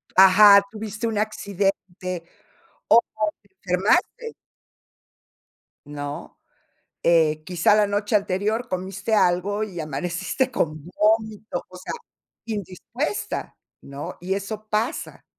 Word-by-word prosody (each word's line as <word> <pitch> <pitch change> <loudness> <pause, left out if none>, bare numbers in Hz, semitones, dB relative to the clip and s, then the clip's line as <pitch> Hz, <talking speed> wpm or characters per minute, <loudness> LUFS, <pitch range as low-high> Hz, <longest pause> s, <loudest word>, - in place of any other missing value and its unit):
Ajá, 200 +2 +9
tuviste 215 +1 -4
un 220 -2 -2
accidente 195 -4 -2 0.7
o 230 - +8 0.4
te 200 -2 -31 0.2
enfermaste 350 - +1 1.5
¿No?, 145 0 -7 0.7
eh, 155 -2 +3
quizá 180 +3 +3
la 210 -1 +4
noche 205 +1 -1
anterior 210 +4 0
comiste 190 +2 -3
algo 200 +1 +2
y 190 -5 -6
amaneciste 170 - -2
con 155 - -2
vómito, 215 +3 0
o 185 - -11
sea, 180 - -6 0.5
indispuesta, 220 - -4 0.3
¿no?, 140 +1 -7
y 185 +2 -1
eso 215 +2 -5
pasa, 215 +2 -2
200 Hz, 100 wpm, -23 LUFS, 180-215 Hz, 1.5 s, Ajá